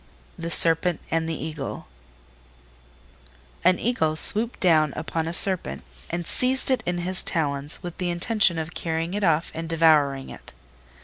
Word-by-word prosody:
THE 165 0 -6
SERPENT 165 0 +3
AND 165 0 -1
THE 165 - -3
EAGLE 155 -3 -6 1.8
An 185 0 +4
Eagle 160 -10 -1
swooped 220 +8 +3
down 155 -5 +2
upon 160 +1 -4
a - - -3
Serpent 175 - +4 0.3
and 170 0 -4
seized 260 +6 0
it 255 -4 +1
in 180 0 -1
his 185 +2 -2
talons 145 -1 0
with 175 -1 -8
the 180 -1 -2
intention 175 +1 +1
of 160 +1 -5
carrying 165 +1 -4
it 205 0 -3
off 165 -2 +1
and 165 0 -6
devouring 150 -5 +2
it. - - -13
165 Hz, 150 wpm, -23 LUFS, 160-180 Hz, 1.8 s, An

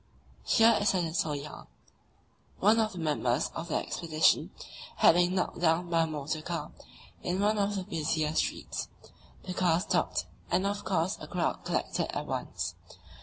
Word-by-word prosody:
Here 225 -1 +5
is 205 - +2
a - - +2
little 160 -3 -1
yarn: 145 +1 -8 0.9
One 215 +4 +5
of 215 -2 +1
the - - -9
members 145 -5 0
of 165 - -5
the 160 - -2
expedition 160 -2 +2 0.5
had - - +6
been 175 +1 +2
knocked 180 -2 -1
down 170 +1 +2
by 165 -1 +4
a 165 - +1
motor 155 0 -3
car 160 -2 -4 0.5
in 180 +2 -1
one 210 +1 +2
of 205 0 +1
the 190 - -2
busiest 155 -2 -1
streets; - - -3 0.5
the 185 - -5
car 175 -3 +2
stopped 185 - 0 0.2
and 190 - +1
of 205 +1 -2
course 165 +4 0
a - - -7
crowd - - -1
collected - - -1
at - - -3
once. - - -3
170 Hz, 170 wpm, -30 LUFS, 160-190 Hz, 0.9 s, had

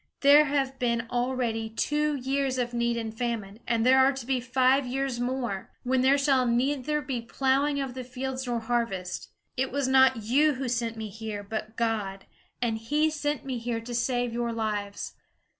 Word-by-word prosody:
There 290 +2 +7
have 270 -2 -1
been 235 -1 0
already 240 -3 -1
two 295 +6 0
years 270 0 -1
of 245 -1 -1
need 235 0 0
and 225 -1 -4
famine, 225 -4 -3
and 230 -1 +1
there 260 +1 +6
are 265 +1 +6
to 265 -3 -7
be 260 0 +1
five 255 +2 +3
years 265 -1 -2
more, 245 -6 -2
when 255 0 +2
there 270 +2 +5
shall 270 -3 +3
neither 280 +5 0
be 255 -3 -3
plowing 275 +4 +1
of 270 -2 -3
the 255 0 -5
fields 260 +1 -4
nor 240 -1 -1
harvest. 225 -6 -2 0.3
It 260 +1 0
was 280 0 0
not 260 -3 +5
you 290 +7 +3
who 260 0 -3
sent 235 -1 -1
me 220 -1 -5
here, 215 0 -6
but 215 +1 -5
God; 210 -4 -1 0.4
and 225 -2 0
he 300 +7 +1
sent 295 -1 -2
me 255 -3 -3
to 230 0 -3
save 245 0 0
your 235 0 -1
lives. 210 -3 -3
245 Hz, 180 wpm, -27 LUFS, 230-270 Hz, 0.4 s, There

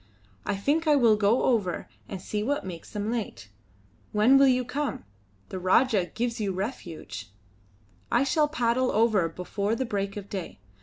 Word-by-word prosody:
"I 200 - +1
think 295 +11 0
I 300 - +6
will 235 -6 +5
go 210 +3 +2
over 205 -8 0 0.2
and 195 - -5
see 210 +3 -3
what 285 +4 -1
makes 170 -3 -8
them 210 +1 -2
late. 220 - -4 0.6
When 215 +6 +5
will 275 0 +7
you 255 -1 +2
come? 285 - -3 0.4
The 185 - -5
Rajah 190 +2 +3
gives 235 0 -1
you 200 -2 0
refuge." 180 - -6 0.8
"I 240 - +4
shall 300 +2 +2
paddle 250 -3 +1
over 215 -6 +3
before 200 +5 -2
the 260 - -2
break 200 -2 -3
of 200 -1 -7
day. 190 -4 -6
220 Hz, 165 wpm, -27 LUFS, 195-255 Hz, 0.8 s, will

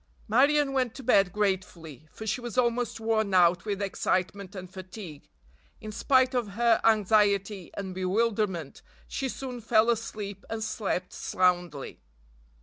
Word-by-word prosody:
Marion 275 +5 +3
went 255 -3 0
to 270 - -9
bed 195 -6 +4
gratefully, 180 - -3
for 220 - -9
she 220 +3 -1
was 240 +1 -6
almost 240 -2 +1
worn 220 -3 0
out 175 0 +4
with 205 -1 -2
excitement 195 +1 -2
and 185 -1 -7
fatigue. 185 -5 -10 0.5
In 215 - -7
spite 260 +4 +3
of 235 -6 -1
her 230 +1 +3
anxiety 205 -3 +2
and 190 -2 -5
bewilderment 190 -4 -1 0.3
she 270 -1 -3
soon 250 -2 -6
fell 225 +1 +4
asleep 210 -3 -5
and 225 -1 -3
slept 195 -5 -3
soundly. 175 -5 0
210 Hz, 140 wpm, -28 LUFS, 185-230 Hz, 0.5 s, bed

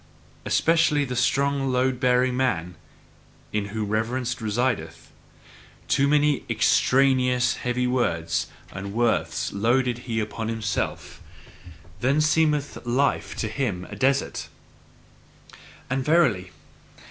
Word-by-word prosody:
Especially 155 -3 +2
the 125 -1 -4
strong 135 +2 +1
load 125 0 +1
bearing 125 0 +2
man 100 -10 -1 0.8
in 105 -1 0
whom 105 0 -4
reverence 120 +3 -1
resideth. 120 +4 -2 0.8
Too 140 0 +2
many 150 -1 +2
EXTRANEOUS 125 -2 +3
heavy 125 0 -1
words 85 -10 0 0.2
and 100 +1 -6
worths 120 0 0
loadeth 120 +4 +1
he 115 -2 -3
upon 110 +1 -4
himself 110 -2 -3 0.8
then 135 +6 +2
seemeth 150 -2 +1
life 130 +4 0
to 110 - -2
him 105 -6 -3
a - - -6
desert! 135 +1 0 1.4
And 130 +1 -1
verily! 130 - +2
125 Hz, 105 wpm, -24 LUFS, 110-135 Hz, 1.4 s, EXTRANEOUS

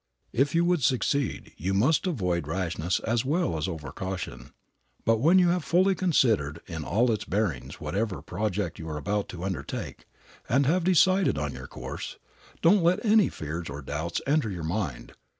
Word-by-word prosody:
If 140 +5 +2
you 170 +1 +4
would 175 -3 +2
succeed, 130 +1 0
you 95 +4 -1
must 140 - +3
avoid 90 - -1
rashness 85 +1 -1
as 115 0 0
well 145 - 0
as 80 +3 -1
over 80 -6 -5
caution. 90 -11 -5 0.6
But 115 -1 +3
when 165 +9 +5
you 180 -2 +5
have 175 -1 +1
fully 185 +4 +3
considered 115 - +2
in 80 -3 -5
all 115 +9 +2
its 110 - -1
bearings 95 - -2
whatever 105 -1 -2
project 100 -2 -2
you 80 0 -6
are 75 - -3
about 100 +7 -2
to 90 0 -7
undertake, 90 -8 -5 0.4
and 135 +3 +3
have 170 +6 +2
decided 185 - +4
on 70 -1 -2
your - - -8
course, - - -7 0.5
don't 190 +4 +6
let 175 +7 +2
any 215 -1 +5
fears 80 +2 -5
or 70 0 -7
doubts 80 +5 -3
enter 145 -4 +2
your 90 -4 -5
mind. 80 - -3
105 Hz, 175 wpm, -27 LUFS, -, 0.6 s, don't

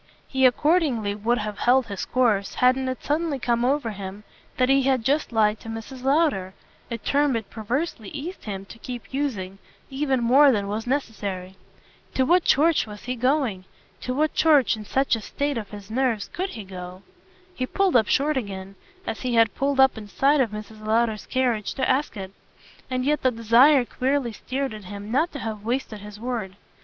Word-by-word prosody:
He 265 -1 +4
accordingly 260 - +1
would 220 +4 0
have 210 -2 -4
held 255 +1 +4
his 200 -3 -5
course 220 -6 +1
hadn't 260 +1 +3
it 255 - -5
suddenly 300 0 0
come 240 -2 0
over 260 -2 +1
him 200 0 -7 0.3
that 255 - +3
he 270 +1 +4
had 260 -3 +1
just 285 +4 +1
lied 215 -1 +2
to 225 - -10
Mrs. 225 +3 -7
Lowder 270 - +1 0.3
a 235 - -3
term 280 +3 +1
it 220 -3 -4
perversely 225 - -3
eased 325 +6 -7
him 195 -2 -5
to 230 - -13
keep 245 +1 -8
using 200 -9 -3 0.3
even 270 -1 0
more 270 +4 +6
than 205 -4 0
was 215 +3 -3
necessary. 200 -8 -3 0.6
To 260 - +3
what 350 +5 +4
church 310 -2 +3
was 210 -1 -10
he 250 +1 -3
going, 250 -6 0 0.3
to 255 - -3
what 310 +2 +1
church, 300 -7 +4
in 215 -1 -9
such 270 +4 +1
a 225 - -6
state 285 +5 -2
of 215 -4 -5
his 205 0 -10
nerves, 235 -4 0
COULD 375 +2 -2
he 220 - -7
go? 185 0 -9 0.5
he 255 -5 -3
pulled 390 0 +1
up 220 -3 +5
short 295 +1 +2
again, 195 -4 -5 0.3
as - - -4
he 250 -2 -1
had 225 -2 +4
pulled 275 0 -1
up 265 -4 +5
in 210 - -10
sight 275 +7 +3
of 240 - +1
Mrs. 215 +1 -9
Lowder's 220 0 0
carriage, 245 -5 0
to 265 - 0
ask 265 -3 0
it. 190 -1 -6 0.6
And 255 0 -1
yet 300 +1 +1
the 260 - +4
desire 245 +4 +5
queerly 260 0 -1
stirred 265 +4 -3
in 215 - -8
him 205 +2 -8
not 310 +8 +2
to - - -5
have 220 -5 -5
wasted 230 -2 -2
his 210 0 -10
word. 225 -5 -4
245 Hz, 195 wpm, -24 LUFS, 210-270 Hz, 0.6 s, more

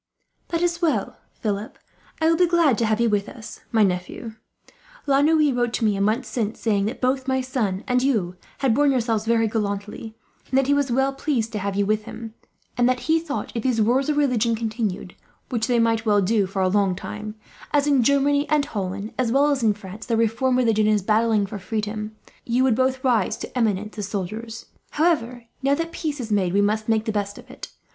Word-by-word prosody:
"That 335 0 -1
is 345 0 0
well, 285 - 0 0.2
Philip. 210 0 -3 0.4
I 320 - +1
will 330 - +4
be 360 +1 +3
glad 335 -7 +3
to 230 - +1
have 215 0 +1
you 235 - +3
with 205 -2 0
us, 230 -5 -10
my 220 -2 +4
nephew. 185 +4 -2 0.7
La 275 -1 +3
Noue 305 -2 +3
wrote 240 -1 0
to 230 - 0
me, 210 -2 +2
a 195 - -2
month 220 +5 +1
since, 220 -1 -3
saying 205 -3 +1
that 225 +5 -4
both 260 +1 0
my 265 0 +1
son 225 -7 -2
and 250 -1 +2
you 215 -10 0 0.3
had 265 -5 +3
borne 290 +4 +3
yourselves 230 -5 0
very 225 -1 +3
gallantly; 210 +1 -4 0.4
that 270 0 +3
he 285 - +2
was 285 -3 +1
well 265 +2 +1
pleased 260 -5 -1
to 215 - -3
have 200 0 -3
had - - -1
you 200 - +2
with 215 +1 0
him; 225 -1 -8 0.4
and 245 0 +3
that 255 -1 0
he 320 +1 +2
thought 310 -3 -4
that, - - -7
if - - -1
these 250 -3 +1
wars 250 +6 +2
of 295 - 0
religion 240 -5 +2
continued 220 -5 -3 0.4
which 225 -3 -1
they 245 -2 +2
might 230 -1 +2
well 210 -2 +3
do 200 0 +2
for 190 0 -2
a - - +3
long 195 -1 +2
time, 210 +3 -7 0.4
as 290 -1 +2
in 280 -3 +3
Germany 280 +3 +2
and 300 -2 +2
Holland, 200 0 -4
as 245 -3 +1
well 285 +3 +3
as 275 -2 0
in 215 -3 +2
France, 205 +1 -10
the 230 -2 +1
reformed 235 +3 +1
religion 225 -4 +2
is 210 -2 +2
battling 215 0 +2
for 205 +1 -7
freedom 215 +2 -4 0.3
you 245 +2 +1
would 260 -2 +4
both 260 +2 0
rise 235 -7 +1
to - - -8
eminence 210 -3 -1
as 200 - -3
soldiers. 215 +3 -5 0.2
"However, 255 -7 0 0.2
now 275 +1 +2
that 330 +2 -3
peace 305 -4 -4
is 230 -3 -5
made, 190 -4 +1
we 200 - +3
must 215 +2 0
make 220 -1 +2
the 220 - -1
best 205 -1 -3
of - - -13
it. - - -9
230 Hz, 225 wpm, -23 LUFS, 210-265 Hz, 0.7 s, will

